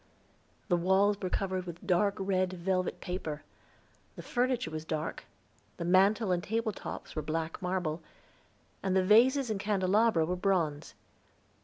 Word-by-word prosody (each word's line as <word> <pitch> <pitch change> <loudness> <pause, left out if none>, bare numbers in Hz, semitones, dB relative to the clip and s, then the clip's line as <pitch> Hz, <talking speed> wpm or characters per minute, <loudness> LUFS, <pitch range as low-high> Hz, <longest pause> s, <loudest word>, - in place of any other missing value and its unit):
The 180 - +3
walls 195 +3 +2
were 185 - -2
covered 185 -2 -2
with 170 -1 -8
dark 195 +2 +2
red 185 -2 0
velvet 185 +1 -1
paper, 160 -4 -4 0.7
the - - -9
furniture 245 -8 0
was 155 0 -4
dark, 155 -1 -4 0.5
the 170 - -4
mantel 195 +3 +4
and 175 -1 0
table 225 +1 -1
tops - - -8
were 155 - -1
black 160 +2 -3
marble, 180 -3 -2 0.8
and 190 -1 0
the 190 -1 +3
vases 245 +5 +5
and 205 - -2
candelabra 200 -2 +2
were 180 +3 -1
bronze. 175 -6 -1
185 Hz, 145 wpm, -30 LUFS, 170-205 Hz, 0.8 s, vases